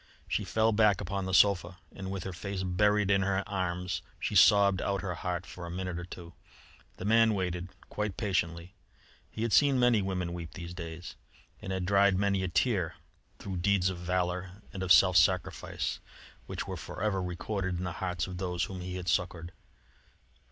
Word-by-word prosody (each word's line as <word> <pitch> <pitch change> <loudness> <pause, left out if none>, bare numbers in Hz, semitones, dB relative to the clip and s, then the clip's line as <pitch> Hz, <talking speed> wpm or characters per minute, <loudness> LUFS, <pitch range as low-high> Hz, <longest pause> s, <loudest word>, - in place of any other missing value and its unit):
She - - -1
fell 110 0 +2
back 105 -3 +4
upon 100 0 -3
the 95 - -3
sofa 95 -3 +4 0.2
and 95 -1 -6
with 95 -2 -4
her 95 - -5
face 100 +2 -4
buried 105 +2 +2
in 100 -1 +4
her 95 +1 0
arms 90 -2 -2 0.2
she - - -2
sobbed 100 -3 +6
out 100 0 -1
her 95 -2 -2
heart 90 +1 -3
for 85 -1 -8
a - - -7
minute 90 0 -4
or 85 - -6
two. 85 -1 -10 0.6
The 90 - -6
man 110 0 +4
waited 90 -1 -2 0.2
quite 105 -3 -3
patiently. 90 -4 -1 0.6
He 110 - -5
had 115 - 0
seen 140 -3 +5
many 120 -3 +4
women 90 -3 -2
weep 85 -2 -7
these 85 0 -7
days, 85 0 -7 0.5
and 95 - -5
had 95 -1 -2
dried 100 0 +4
many 100 -1 +1
a 95 - -1
tear 90 -3 0 0.4
through 95 -2 -5
deeds 95 0 +2
of 90 - -7
valour 90 +2 -2
and 95 - -5
of 95 -1 0
self 90 +2 +7
sacrifice, 90 0 +1 0.5
which - - -4
were - - -4
for 95 - -7
ever 95 -3 +1
recorded 90 +1 -3
in 90 - -4
the 90 - -2
hearts 90 -3 -1
of 90 -1 -7
those 90 -2 -1
whom 95 -3 -5
he 90 0 -5
had 90 -1 -6
succoured. 85 0 -1
95 Hz, 190 wpm, -30 LUFS, 90-100 Hz, 0.6 s, self